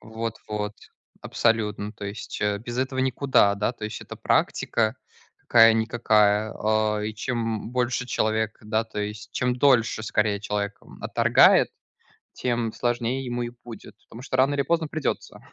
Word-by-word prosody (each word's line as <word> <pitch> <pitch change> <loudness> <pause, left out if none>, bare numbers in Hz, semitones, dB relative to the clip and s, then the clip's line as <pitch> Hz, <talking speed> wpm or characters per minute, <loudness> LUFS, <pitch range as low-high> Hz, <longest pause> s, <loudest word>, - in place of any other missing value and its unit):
Вот 115 0 -5
вот 105 0 -3 0.5
абсолютно. 105 -2 0
То 105 - -9
есть, 100 +2 -6
э, 105 0 +1
без 120 +2 -7
этого 130 0 -2
никуда. 130 -5 +3
Да, 105 +4 0
то 110 - -9
есть 105 0 -5
это - - -9
практика 110 0 +1 0.4
какая-никакая. 110 -2 +4
А, 110 0 0
и 105 +1 -4
чем, 120 +3 -3 0.3
м, - - -7
больше 125 0 -1
человек, 110 -2 0
да, 110 +1 -1
то 110 -2 -6
есть 105 0 -6
Чем 125 -1 0
дольше, 120 -5 +3
скорее, 105 -1 0
человек, 100 0 -3
м, - - -15
отторгает, - - +5 0.7
тем 120 -3 -1
сложнее 120 +2 -1
ему 120 0 -3
и 120 - -5
будет, 110 -3 -11
потому 115 - -10
что 130 - -4
рано 135 +2 +3
или 140 - +1
поздно 165 +2 0
придется. 155 -3 -3
110 Hz, 160 wpm, -25 LUFS, 105-120 Hz, 0.7 s, отторгает